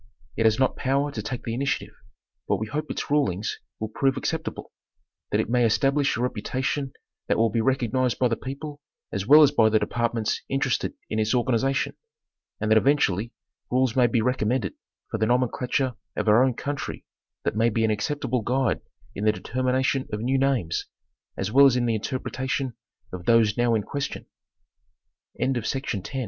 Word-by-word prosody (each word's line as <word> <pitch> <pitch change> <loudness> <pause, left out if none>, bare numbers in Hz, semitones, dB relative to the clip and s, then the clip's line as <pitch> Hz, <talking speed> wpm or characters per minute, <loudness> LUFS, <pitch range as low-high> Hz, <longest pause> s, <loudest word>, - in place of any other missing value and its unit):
It 115 - +1
has 110 0 +3
not 130 -1 +2
power 140 +2 0
to - - -4
take 125 -3 -5
the 115 - -3
initiative; 135 +4 -2 0.5
but - - +2
we 110 - -3
hope 150 +7 -4
its - - -4
rulings 110 -9 0 0.2
will 110 - -3
prove 135 +4 +1
acceptable; 160 +4 -4 0.6
that - - +1
it - - 0
may 120 +2 +2
establish 135 +5 +2
a - - -2
reputation 130 +4 -2 0.3
that - - +2
will 115 -1 +3
be 115 - +1
recognized 130 0 +1
by 125 - +3
the 115 - 0
people 145 +3 -7 0.3
as 100 -1 -3
well 150 +3 +9
as 145 - +5
by 115 -6 +4
the 110 - +4
departments 115 0 -1
interested 135 -1 0 0.2
in 110 - 0
its 110 +3 +1
organization; 130 +2 +1 0.6
and 105 +1 -1
that 110 - +7
eventually 120 -6 +2 0.4
rules 125 -2 +1
may 125 -2 +5
be 115 -1 +1
recommended 125 0 0 0.4
for 110 - -2
the 110 - +2
nomenclature 125 +1 +1 0.2
of - - -2
our 110 +4 +6
own 130 -2 +1
country 145 +2 -5 0.4
that - - -1
may 115 +2 +3
be 115 0 +1
an 110 - +2
acceptable 125 +3 -1
guide 125 +2 0 0.3
in 100 - -5
the 110 - +5
determination 130 +4 0
of 105 - -2
new 130 +3 +1
names, 130 -12 0 0.5
as 95 +2 -2
well 140 +3 +8
as 130 - +3
in 125 -1 +1
the 115 - +1
interpretation 130 +3 -2 0.4
of 90 -1 -6
those 115 -3 +4
no 120 -2 +2
125 Hz, 170 wpm, -25 LUFS, 110-135 Hz, 0.6 s, well